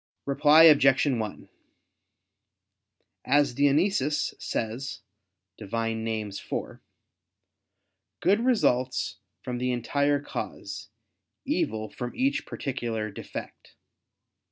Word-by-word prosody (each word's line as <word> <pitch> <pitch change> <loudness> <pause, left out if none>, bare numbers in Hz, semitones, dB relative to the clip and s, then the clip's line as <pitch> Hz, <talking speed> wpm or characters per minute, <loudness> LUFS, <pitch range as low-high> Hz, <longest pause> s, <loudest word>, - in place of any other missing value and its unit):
Reply 150 +3 +6
Obj. 140 -4 +6
1: 115 -7 -2 1.8
As 145 -2 +3
Dionysius 145 +2 +2
says 115 +5 -4 0.6
(Div. 105 -2 -10
Nom. 115 -1 -1
iv), 110 -3 -3 1.9
"good 200 +4 +3
results 130 - +1 0.3
from 125 -1 -4
the 125 0 0
entire 140 +4 +1
cause, 145 - -6 0.6
evil 110 0 -1
from 120 +3 -6
each 270 +2 0
particular 115 -5 -3
defect." - - -9
130 Hz, 85 wpm, -27 LUFS, 115-145 Hz, 1.9 s, Reply